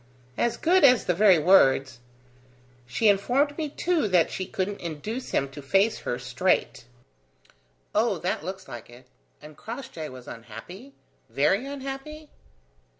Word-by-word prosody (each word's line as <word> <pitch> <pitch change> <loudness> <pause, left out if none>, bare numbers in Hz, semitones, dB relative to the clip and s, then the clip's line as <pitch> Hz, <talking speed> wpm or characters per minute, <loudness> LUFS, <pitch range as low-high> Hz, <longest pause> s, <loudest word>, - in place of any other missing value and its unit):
"As 235 - 0
good 365 +2 +3
as 255 -4 +6
the 180 - +2
very 190 0 +5
words. 135 -7 +4 0.9
She 170 - +1
informed 250 +9 +2
me, 310 -2 -3
too, 335 -2 0
that 180 -4 +3
she 185 - -4
couldn't 200 +2 -3
induce 175 - -5
him 140 - 0
to 140 +2 -10
face 195 +10 +2
her 120 - -3
straight." 125 -1 -1 1.1
"Oh, - - +2
that - - -2
looks 190 +2 -7
like 120 -4 -9
it. 120 +1 -15 0.4
And 150 0 -12
Crossjay 220 - -7
was 130 -1 -12
unhappy? 125 - -11 0.3
Very 195 - +1
unhappy?" 280 +2 -7
195 Hz, 140 wpm, -26 LUFS, -, 1.1 s, as